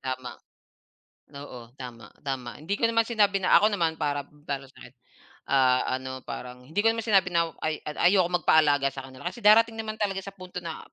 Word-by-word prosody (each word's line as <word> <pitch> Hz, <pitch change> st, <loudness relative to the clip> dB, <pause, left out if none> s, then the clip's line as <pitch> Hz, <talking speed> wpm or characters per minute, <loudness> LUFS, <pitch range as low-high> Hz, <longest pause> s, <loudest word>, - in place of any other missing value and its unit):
Tama. 130 Hz, -1 st, -5 dB, 1.0 s
Oo, 125 Hz, -4 st, -10 dB
tama, 120 Hz, -4 st, -9 dB
tama. 130 Hz, -2 st, -5 dB
Hindi 195 Hz, +6 st, -2 dB
ko 230 Hz, -, -1 dB
naman 230 Hz, 0 st, +3 dB
sinabi 205 Hz, -4 st, +2 dB
na 185 Hz, -, +5 dB
ako 210 Hz, 0 st, +4 dB
naman, 165 Hz, -4 st, 0 dB
para 145 Hz, -1 st, -2 dB, 0.4 s
sakin, 120 Hz, -2 st, -15 dB, 0.6 s
ah, 130 Hz, -2 st, +4 dB, 0.2 s
ano 130 Hz, 0 st, -7 dB
parang 125 Hz, 0 st, -8 dB
hindi 155 Hz, +9 st, -4 dB
ko 225 Hz, -, +3 dB
naman 225 Hz, 0 st, +1 dB
sinabi 200 Hz, -5 st, +3 dB
na 165 Hz, -1 st, +2 dB
ay 155 Hz, -1 st, -3 dB
ayoko 175 Hz, +3 st, +2 dB
magpa-alaga 150 Hz, -5 st, +3 dB
sa 135 Hz, -, -6 dB
kanila, 130 Hz, +4 st, -8 dB
kasi 230 Hz, +5 st, -7 dB
darating 225 Hz, +2 st, +6 dB
naman 220 Hz, -1 st, -5 dB
talaga 195 Hz, -2 st, -1 dB
sa 195 Hz, -, -8 dB
punto 185 Hz, -2 st, -9 dB
na, 165 Hz, -2 st, -6 dB
160 Hz, 180 wpm, -27 LUFS, 130-200 Hz, 1.0 s, darating